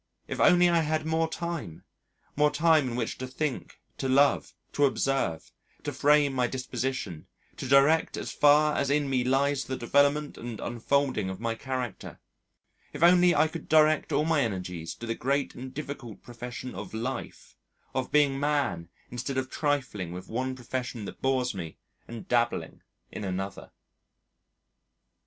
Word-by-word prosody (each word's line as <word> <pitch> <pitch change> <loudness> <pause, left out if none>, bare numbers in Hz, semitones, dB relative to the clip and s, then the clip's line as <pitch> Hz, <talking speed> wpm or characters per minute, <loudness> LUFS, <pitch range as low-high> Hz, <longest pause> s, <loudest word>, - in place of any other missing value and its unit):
If - - -5
only 180 0 +6
I 170 -1 +3
had 155 0 0
more 160 0 +1
time! 165 - -5 0.5
more 150 +1 +4
time 155 -1 +3
in 120 - -4
which 120 -2 -3
to 130 - -4
think, 135 +1 -4 0.2
to 135 - -1
love, 140 +2 +3 0.2
to 145 - +3
observe, 135 - -1 0.3
to - - -3
frame 145 -1 +4
my 125 -2 +1
disposition, 125 -8 -4 0.3
to - - -5
direct 140 +4 +4
as - - -4
far 150 +1 +4
as 140 - 0
in 145 0 +2
me 130 -2 +1
lies 135 +2 +1
the 130 - -3
development 145 +4 +2
and 115 -2 -6
unfolding 120 -3 0
of 95 0 -6
my 115 0 -1
character, 125 -3 -5 0.7
if 145 - -2
only 175 0 +6
I 155 +2 +4
could 160 0 -8
direct 155 -1 +4
all 150 - +2
my 160 -3 +2
energies 90 -7 -3
to 120 - -8
the 115 - -1
great 140 +4 -1
and 130 +1 -8
difficult 135 -6 -7
profession 125 +1 -7
of 100 +2 -7
life, 125 +4 -5 0.4
of 130 - -2
being 145 -2 +3
man 145 - 0 0.2
instead 125 +2 -4
of 130 0 -2
trifling 130 - -1
with 90 +1 -8
one 130 +3 -2
profession 125 -3 -5
that - - -9
bores 130 -2 +1
me 85 -5 -7 0.3
and 115 -1 -8
dabbling 120 -1 0 0.3
in - - -6
another. 95 0 -4
130 Hz, 160 wpm, -28 LUFS, 120-145 Hz, 0.7 s, only